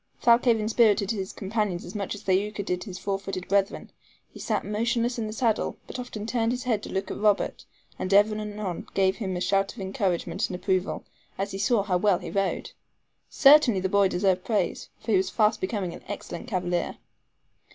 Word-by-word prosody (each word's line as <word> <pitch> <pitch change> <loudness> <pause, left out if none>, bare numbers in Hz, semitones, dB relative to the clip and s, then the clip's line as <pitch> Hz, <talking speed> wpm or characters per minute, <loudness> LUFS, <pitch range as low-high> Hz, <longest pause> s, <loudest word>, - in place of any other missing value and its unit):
Thalcave 235 -1 +4
inspirited 215 -2 +3
his 195 -4 -3
companions 200 -3 -2
as 175 - -9
much 205 -1 -3
as 205 - -11
Thaouka 200 +2 0
did 180 +1 -2
his 190 -4 -7
four 195 +1 -2
footed 190 -2 -5
brethren. 195 0 0 0.4
He - - -11
sat - - -1
motionless 235 +3 0
in 220 - -2
the - - -5
saddle, 225 0 0
but 255 - -7
often 220 -4 -6
turned 230 0 0
his 250 - -4
head 225 -5 0
to - - -8
look 190 - -2
at - - -5
Robert, 205 -1 +1 0.3
and 185 - -3
ever 205 +2 +5
and 215 - -3
anon 210 -4 -5
gave 190 -1 +2
him 190 -5 -3
a - - -4
shout 195 +2 +1
of - - -11
encouragement 190 -2 -1
and 180 - -4
approval, 185 0 -1 0.3
as 195 +1 -2
he 195 - -5
saw 205 +1 +2
how 190 -3 +1
well 195 0 +3
he - - -7
rode. 195 -1 -1 0.6
Certainly 275 -8 +6
the 190 - 0
boy 200 0 +4
deserved 185 0 +1
praise, 215 -3 -1
for 225 - -4
he 200 - +5
was 185 0 +1
fast 215 0 +2
becoming 185 -2 -2
an - - -10
excellent 175 - -6
cavalier. 180 -5 -1
200 Hz, 205 wpm, -26 LUFS, 190-220 Hz, 0.6 s, Certainly